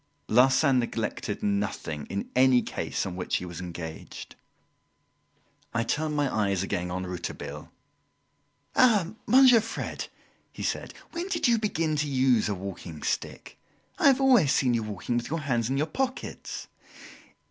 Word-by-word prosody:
Larsan 130 +3 +5
neglected 110 -3 -3
nothing 100 -7 -2
in 100 - -4
any 130 -1 +5
case - - -3
on 95 -2 -5
which 90 - -2
he 90 - -2
was 85 0 -7
engaged. 85 -2 -8 1.4
I 115 - +2
turned 150 +5 -1
my 145 -5 0
eyes 95 -1 0
again 90 -2 -2
on 90 +1 -3
Rouletabille. 90 -1 -6 1.0
"Ah, 210 -7 +4
Monsieur 255 -3 +7
Fred!" 225 - -5 0.4
he - - -7
said, - - -3 0.2
"when 345 +2 -4
did 335 -7 +1
you 235 -1 +4
begin 165 -7 0
to 150 0 0
use 130 -5 +2
a 100 - -1
walking 90 -4 -7
stick? - - -4 0.4
I - - +5
have 275 -1 +5
always 250 - +5
seen 125 -3 +2
you 115 - +1
walking 110 +2 -3
with 120 - -3
your 165 +1 -2
hands 120 -5 0
in 135 - 0
your 150 - +2
pockets!" 260 - -4
125 Hz, 150 wpm, -27 LUFS, 100-165 Hz, 1.4 s, Monsieur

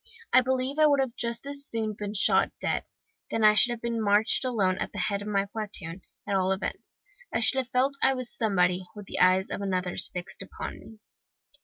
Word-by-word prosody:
I 255 - +7
believe 260 +3 -1
I 310 - +6
would 285 -1 +3
have 265 -3 -1
just 235 +2 -2
as 280 0 -3
soon 220 -2 -2
been 205 0 -6
shot 200 - +4
dead - - -1 0.4
then 225 - -1
I 215 0 +7
should 225 +3 +5
have 240 -1 -4
marched 220 -1 +3
alone 200 -8 0
at - - -4
the - - -8
head 200 +1 -1
of 205 - -7
my 200 -1 0
platoon, 200 -4 -6 0.3
at 200 - 0
all 190 0 +1
events; 195 - -5 0.3
I - - 0
should 265 - +3
have 255 -1 -4
felt 260 +2 +1
I 265 0 +3
was 255 -2 -2
somebody, 180 -4 +1
with 205 -1 -9
the - - -4
eyes 185 +1 +3
of - - -4
others 185 -2 -1
fixed 180 -1 -5
upon - - -6
me. 220 -1 -15
215 Hz, 210 wpm, -27 LUFS, 195-250 Hz, 0.4 s, I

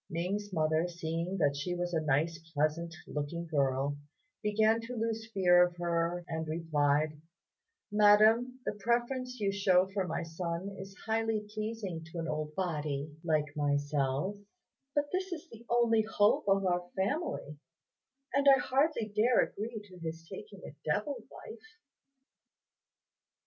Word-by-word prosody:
Ning's 195 +5 -2
mother, 160 0 +2
seeing 170 +2 -3
that 145 -5 +2
she 160 +5 -2
was 175 0 -2
a 160 - +2
nice 155 +3 +1 0.2
pleasant 160 +3 0
looking 150 +4 -4
girl, 140 -2 0 0.4
began 220 +1 +3
to 240 +2 -6
lose 225 -1 -2
fear 180 -3 +6
of 175 0 -1
her, 170 0 -1
and 160 -1 -3
replied, 150 -2 +1 0.7
"Madam, 215 +4 +5
the - - +1
preference 240 +4 -1
you 200 -2 +1
shew 190 -2 +3
for 195 -2 0
my 175 - -2
son 170 +3 -4
is 195 +1 -9
highly 225 -1 0
pleasing 215 -6 -4
to 160 +2 -10
an 165 0 -2
old 155 0 -3
body 150 -5 -2
like 150 -3 0
myself; 145 +4 0 0.6
but 290 0 +3
this 375 +1 -2
is 345 0 -5
the 230 0 -12
only 235 -2 +4
hope 210 -1 +2
of 195 0 +3
our 175 -1 0
family, 195 - -2 0.7
and 280 +1 +2
I 270 - +8
hardly 270 -3 +1
dare 215 +4 +3
agree 220 +2 -3
to 185 -3 -14
his 165 0 -6
taking 430 - -10
a - - -9
devil 290 -2 0
wife." 445 -2 -11
180 Hz, 145 wpm, -32 LUFS, 160-220 Hz, 0.7 s, I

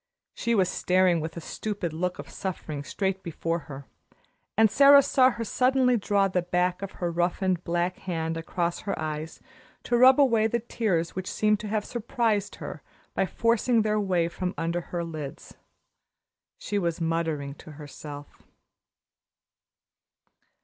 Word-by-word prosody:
She 235 0 0
was 190 -3 +3
staring 180 -1 +2
with 160 +1 -5
a - - -5
stupid 200 -3 -4
look 180 +2 -2
of - - -8
suffering 155 -6 -5
straight 190 +5 -2
before 165 0 -2
her, 140 -1 -8 0.7
and 220 -1 +5
Sara 280 +4 +8
saw 260 -1 +4
her 235 -2 -4
suddenly 255 +2 +2
draw 200 -2 +2
the 185 -1 0
back 180 +1 0
of 195 - -6
her 175 -1 -3
roughened, 175 +1 0
black 175 +1 -1
hand 165 -3 -3
across 170 +1 -2
her 200 - -3
eyes 155 0 -5 0.4
to 240 - 0
rub 255 +3 +7
away 230 -6 +4
the 235 - 0
tears 215 -7 -1
which 185 0 -4
seemed 210 -1 +2
to 215 - -6
have 210 0 -1
surprised 225 -3 -1
her - - -8 0.3
by 190 - +1
forcing 230 +2 +2
their 215 0 +1
way 180 -4 +1
from 180 +1 -4
under 170 +1 -1
her 170 0 -4
lids. 155 -3 -7 1.0
She 205 - -2
was 170 -2 -1
muttering 160 -4 -1
to 155 - -11
herself. 145 0 -10
180 Hz, 150 wpm, -27 LUFS, 165-215 Hz, 1.0 s, Sara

